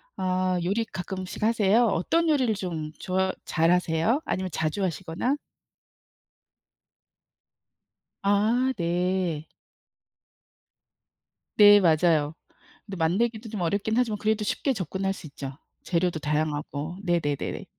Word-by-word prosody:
아, 185 -1 0
요리 205 +6 0
가끔씩 185 -2 -6
하세요? 225 +1 +4
어떤 320 - +1
요리를 260 -7 +2
좀 165 -6 -4
좋아 190 0 0
잘하세요? 175 - +2
아니면 185 0 -2
자주 160 +6 -1
하시거나? 185 - -1 2.9
아, 215 +6 +2
네. 175 -2 -1 2.1
네, 205 -1 +9
맞아요. 160 -3 +3 0.5
근데 195 -2 -7
만들기도 220 +7 0
좀 210 -4 -4
어렵긴 200 +5 0
하지만 230 -4 +1
그래도 215 0 0
쉽게 270 +5 0
접근할 195 0 -2
수 165 - -10
있죠. 135 -1 -8 0.3
재료도 175 -1 0
다양하고. 150 +2 -2
네네네네. 165 -6 -1
185 Hz, 240 characters per minute, -26 LUFS, 165-210 Hz, 2.9 s, 네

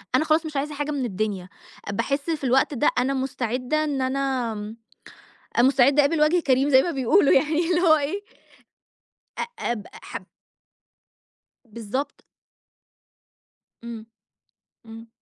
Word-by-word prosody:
أنا 310 - +2
خلاص 315 +1 +2
مش 305 -3 -5
عايزة 295 +2 -2
حاجة 290 +1 -3
من 275 -4 -2
الدنيا، 200 -3 -3 0.4
باحس 275 +9 -2
في 315 -3 -2
الوقت 265 +3 +2
ده 275 +3 +2
أنا 255 +2 +1
مُستعدة 260 +2 -1
إن 285 -3 -2
أنا 260 -3 -1
امم، 210 +1 -7 0.8
أ - - +6
مُستعدة 270 +2 +5
اقابل 310 +2 +1
وجه 325 +4 +4
كريم 270 -2 +2
زي 265 -2 +6
ما 345 - -2
بيقولوا 275 - +3
يعني، 310 +3 +2
اللي 350 0 +2
هو 320 -3 +5
إيه، 305 +8 -3 1.2
أ - - 0 0.3
أب 215 -4 -5
حب - - -9 1.4
بالضبط. 235 +5 -5 1.6
إمم، 230 -2 -8 0.8
إمم. 225 +1 -11
270 Hz, 135 wpm, -24 LUFS, 240-300 Hz, 1.6 s, أ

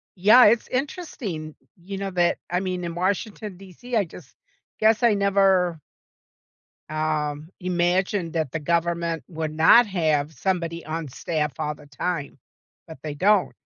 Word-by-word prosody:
Yeah, 210 +7 +7
it's 225 +2 +4
interesting, 250 - -4 0.2
you 190 +3 -7
know, 195 -1 -4
that 175 -1 +2
I 180 - 0
mean, 185 -1 -3
in 170 -1 -4
Washington 200 +2 -2
DC, 195 +6 -8
I 205 - +3
just 160 -4 -14 0.4
guess 220 +2 +3
I 235 -2 +5
never 195 -4 +2 1.1
um, 155 0 -2
imagined 180 0 0
that 160 -6 -1
the 165 - -3
government 170 +1 -1
would 160 -2 -4
not 160 +10 +7
have 155 -5 0
somebody 170 -3 -2
on 160 0 -4
staff 150 +2 -2
all 150 -1 -1
the 150 - -16
time, 145 +1 -4 0.5
but 160 - -10
they 155 -2 -4
don't. 195 +5 +2
175 Hz, 145 wpm, -24 LUFS, 155-195 Hz, 1.1 s, Yeah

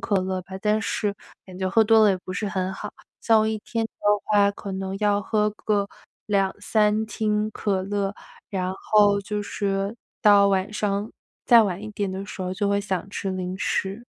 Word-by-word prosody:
可 205 - 0
乐 185 0 -2
吧， 185 - -16
但 215 0 +2
是 210 -2 -1 0.3
感 185 -1 -11
觉 190 0 -1
喝 220 +4 +4
多 220 0 +5
了， 210 - +6
也 190 - +1
不 185 - -5
是 210 +3 -2
很 185 0 -2
好。 210 +2 -6 0.3
像 225 -1 +4
我 215 - +1
1 220 - -2
天 225 +2 -3
的 225 - -6 0.3
话， 205 -1 +4
可 200 0 -8
能 190 0 -4
要 205 -1 +2
喝 210 +1 +1
个 205 -1 -1 0.4
2-3 210 +2 +1
听 215 0 -1
可 195 -3 -1
乐， 200 0 -2 0.4
然 185 -2 -2
后 205 0 +3
就 210 +1 -3
是 200 +1 -2 0.2
到 205 -2 +6
晚 195 +1 +1
上， 205 0 -2 0.4
再 235 -1 +8
晚 195 -1 -2
一 215 - -6
点 200 -2 -2
的 190 +1 -4
时 190 - -6
候， 185 - -3
就 200 +2 -1
会 200 0 +2
想 195 -2 -3
吃 195 -1 -4
零 185 0 -4
食。 195 +4 -2
200 Hz, 205 characters per minute, -24 LUFS, 190-210 Hz, 0.4 s, 再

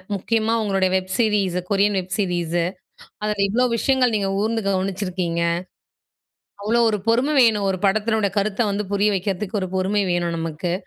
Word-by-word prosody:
முக்கியமா 225 +3 0
உங்களுடைய 195 -2 +1
web 185 0 -2
series 210 -6 +1
Korean 200 0 +2
web 185 +1 -8
series 175 -4 0 0.6
அதில 210 -1 0
இவ்வளோ 245 +5 +2
விஷயங்கள் 255 -1 +2
நீங்க 200 -2 0
கூர்ந்து 225 +1 -1
கவனிச்சிருக்கீங்க. 185 -3 -2 1.2
அவ்வளோ 235 +3 +2
ஒரு 210 - -1
பொறுமை 250 +6 +2
வேணும் 215 -5 +3
ஒரு 190 - -2
படத்தினோட 215 +1 +1
கருத்த 210 +3 0
வந்து 200 0 -2
புரிய 205 +1 +2
வைக்கிறதுக்கு. 195 +2 -2
ஒரு 185 - -3
பொறுமை 195 +2 +1
வேணும் 170 -1 -1
நமக்கு. 165 +2 -3
200 Hz, 150 wpm, -22 LUFS, 185-215 Hz, 1.2 s, வேணும்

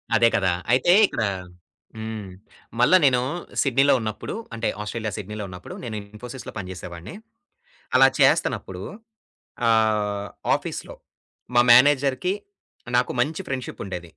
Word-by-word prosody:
అదే 115 +1 +5
కదా! 95 -3 +2 0.2
అయితే 135 +8 +4
ఇక్కడ 115 - -2 0.7
హ్మ్. 110 -2 -5 0.5
మల్లా 155 +10 +6
నేను 125 -2 +4 0.4
సిడ్నీలో 140 +1 +4
ఉన్నప్పుడు 110 -1 -5 0.2
అంటే, 115 - -2
ఆస్ట్రేలియా 110 0 -4
సిడ్నీలో 105 +1 -6
ఉన్నప్పుడు, 90 0 -9
నేను 110 -3 -5 0.2
ఇన్ఫోసిస్‌లో 125 +4 -8
పని 95 -3 -5
జేసేవాడిని. 90 - -9 0.8
అలా 135 +1 +7
చేస్తన్నప్పుడు 95 0 +2 0.9
ఆహ్, 105 -2 +1 0.3
ఆఫీస్‌లో - - -6 0.6
మా 120 - +7
మేనేజర్‌కి 140 +6 +4 0.6
నాకు 125 - +1
మంచి 160 +8 -1
ఫ్రెండ్‌షిప్ 130 -2 -5
ఉండేది. 90 -2 -5
115 Hz, 115 wpm, -24 LUFS, 105-130 Hz, 0.9 s, అలా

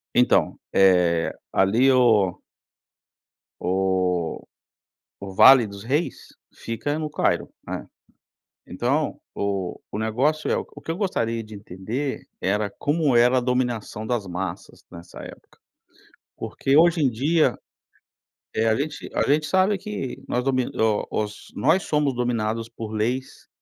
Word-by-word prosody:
Então - - +3
é 90 -3 +4 0.2
ali 115 +8 +4
o 110 -8 +3 1.2
o 90 -2 0 0.7
o 100 -1 -8
Vale 130 +5 +8
dos 100 -1 -9
Reis, 145 +8 -2 0.3
fica 130 +7 -3
no 155 -1 -3
Cairo, 150 - 0 0.2
né, - - -6 0.8
então 135 +10 -1 0.2
o 100 -3 -2
o - - -4
negócio 130 +8 0
é - - +3
o - - -2
que - - -8
eu - - -3
gostaria 115 - -1
de 110 0 -11
entender 105 +8 -5
era 105 +2 0
como 145 +2 0
era 125 +2 +5
a - - +2
dominação 120 -4 -2
das 110 -4 -2
massas 90 +1 -6
nessa 85 0 -11
época, - - -13 0.8
porque 135 +2 0
hoje 170 0 +5
em 140 - +4
dia, 135 +1 +1 1.0
eh, 110 +1 +1
a 110 - +3
gente 145 +5 -4
a - - +2
gente 150 +2 +2
sabe 190 +2 +2
que 190 -10 -6
nós 125 - -1
domi 130 -1 +1
o 110 -2 +1
os 105 -1 -4
nós 165 +8 +2
somos 150 -2 +1
dominados 115 -2 -1
por 115 -2 -7
leis 120 +5 -3
120 Hz, 135 wpm, -24 LUFS, 100-140 Hz, 1.2 s, Vale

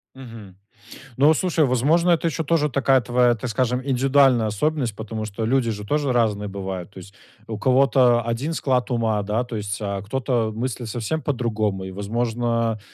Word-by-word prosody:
Мгм. 115 -7 -11 0.6
Ну 140 +3 +5
вот 155 0 +5
слушай, 170 -4 +1
возможно, 150 +8 +2
это 170 0 +2
ещё 165 0 -2
тоже 150 -1 +1
такая 135 -1 +2
твоя, 120 +1 +2
так 120 +2 -5
скажем, 125 +2 0
индивидуальная 135 -3 +3
особенность, 120 +2 -1
потому 110 0 -5
что 110 +1 -4
люди 125 0 +1
же 105 -1 -6
тоже 145 +2 0
разные 105 -4 0
бывают, 95 -2 -6
то 100 - -16
есть 100 +2 -13 0.3
у 110 - -5
кого-то 130 -2 +4
1 120 +8 -2
склад 130 -5 0
ума, 110 -3 0
да, 110 +4 -1
то 120 -1 -7
есть, 105 -1 -3
а 100 -1 -3
кто-то 120 +1 -1
мыслит 120 +1 -4
совсем 120 +8 -3
по-другому. 110 -8 -2
И, 95 - -7
возможно, 115 +2 -1
120 Hz, 175 wpm, -22 LUFS, 110-135 Hz, 0.6 s, Ну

